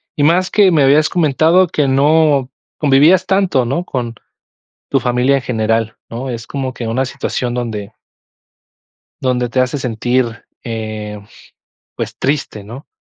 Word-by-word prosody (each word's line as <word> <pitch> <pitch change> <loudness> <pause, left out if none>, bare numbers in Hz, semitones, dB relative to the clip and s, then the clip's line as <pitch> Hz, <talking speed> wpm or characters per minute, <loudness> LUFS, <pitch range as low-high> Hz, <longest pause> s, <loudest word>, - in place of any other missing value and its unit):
y 145 - 0
más 180 +4 +3
que 205 -2 +5
me 155 -4 +3
habías 145 +3 +4
comentado 170 +2 +3
que 150 -3 0
no 140 0 +3 0.3
convivías 150 +5 +4
tanto, 190 -10 +2
¿no?, 140 +9 -2
con 120 -3 -4 0.8
tu 135 - +2
familia 125 +3 +2
en - - -3
general, 115 -1 -1
¿no?, 125 +3 -5
es 115 -1 -5
como 130 -2 -4
que 120 -3 -5
una 130 +4 0
situación 125 -1 -3
donde 110 -5 -4 1.3
donde 125 -2 0
te 130 - -1
hace 130 +3 +1
sentir, 120 -1 -1 0.2
eh, 110 -2 -5 0.8
pues - - -5
triste, 135 -7 -2
¿no?, 120 +8 -11
130 Hz, 145 wpm, -16 LUFS, 115-150 Hz, 1.3 s, que